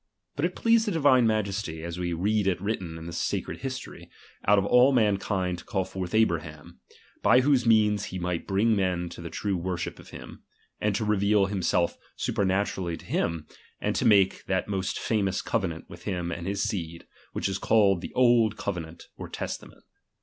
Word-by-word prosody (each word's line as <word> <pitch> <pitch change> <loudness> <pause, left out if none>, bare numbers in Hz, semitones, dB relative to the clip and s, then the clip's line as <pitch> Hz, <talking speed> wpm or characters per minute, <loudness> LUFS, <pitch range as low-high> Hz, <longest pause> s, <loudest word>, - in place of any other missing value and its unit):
But 145 - 0
it 180 - -2
pleased 230 -1 +3
the 205 - 0
Xi\ine 135 -7 +4
Majesty, 100 -6 -2
as 85 +1 -5
we 90 -1 -2
read 100 +4 +1
it 95 -3 +1
written 95 -5 -3
in 80 - -9
the 85 - -7
sacred - - -2
history, 130 -1 -7 0.4
out 105 +1 +6
of 100 - +2
all 125 +5 +5
mankind 100 -6 +1
to - - -11
call 95 -2 -2
forth 95 0 -5
Abraham, 80 -8 -1 0.4
by 125 - +5
whose 130 -3 +2
means 105 -2 +4
he 95 - -6
might 90 -1 -3
bring 105 +4 +2
men 90 -3 0
to - - -10
the 85 - -6
true 100 +2 -2
■worship 90 0 -3
of - - -13
him; - - -11 0.4
and 105 -1 0
to 110 - -1
reveal 105 -1 +3
himself 90 -3 0 0.2
supernatu 100 -2 0
rdly 85 -2 -3
to - - -15
hira, 80 -2 -1 0.4
and - - -1
to - - 0
make 100 -3 +4
that 95 -1 0
most 95 -2 -2
famous 100 -4 0
cove 100 -5 0
nant 80 -1 -9
with 85 - -13
him 90 -4 -2
and 85 +1 -5
his 100 0 -1
seed, 85 -4 -4 0.3
which - - -1
is 95 0 -2
called 100 -5 +3
the - - -7
old 120 -4 +4
covenant 85 -4 -5
or - - -7
testament. - - -7
95 Hz, 195 wpm, -27 LUFS, 90-110 Hz, 0.4 s, out